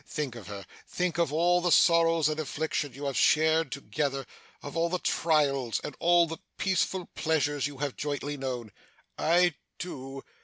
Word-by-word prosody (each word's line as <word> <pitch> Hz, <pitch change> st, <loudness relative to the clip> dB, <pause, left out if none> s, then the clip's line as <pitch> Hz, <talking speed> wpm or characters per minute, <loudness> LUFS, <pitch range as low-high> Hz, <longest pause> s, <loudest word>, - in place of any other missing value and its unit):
Think 150 Hz, -4 st, -3 dB
of 115 Hz, -5 st, -10 dB
her; 100 Hz, -2 st, -7 dB, 0.2 s
think 180 Hz, -1 st, -2 dB
of 170 Hz, -4 st, +2 dB
all 175 Hz, +3 st, +3 dB
the 175 Hz, 0 st, +1 dB
sorrows 165 Hz, -2 st, +5 dB
and 155 Hz, 0 st, -2 dB
afflictions 145 Hz, -2 st, -2 dB
you 140 Hz, +1 st, -6 dB
have 140 Hz, -2 st, -2 dB
shared 160 Hz, -1 st, +3 dB
together; 135 Hz, +1 st, -2 dB, 0.4 s
of 145 Hz, -, -7 dB
all 165 Hz, +1 st, +1 dB
the 180 Hz, -, 0 dB
trials, 140 Hz, -9 st, +1 dB
and 145 Hz, -, -6 dB
all 175 Hz, 0 st, +5 dB
the 165 Hz, 0 st, -7 dB, 0.2 s
peaceful 190 Hz, -1 st, 0 dB
pleasures, 145 Hz, -3 st, 0 dB
you 145 Hz, -1 st, -9 dB
have 140 Hz, -1 st, -3 dB
jointly 145 Hz, 0 st, -3 dB
known.' 125 Hz, -5 st, -4 dB, 0.5 s
'I 175 Hz, +1 st, +4 dB, 0.2 s
do. 135 Hz, -6 st, -7 dB
150 Hz, 165 wpm, -28 LUFS, 135-165 Hz, 0.5 s, sorrows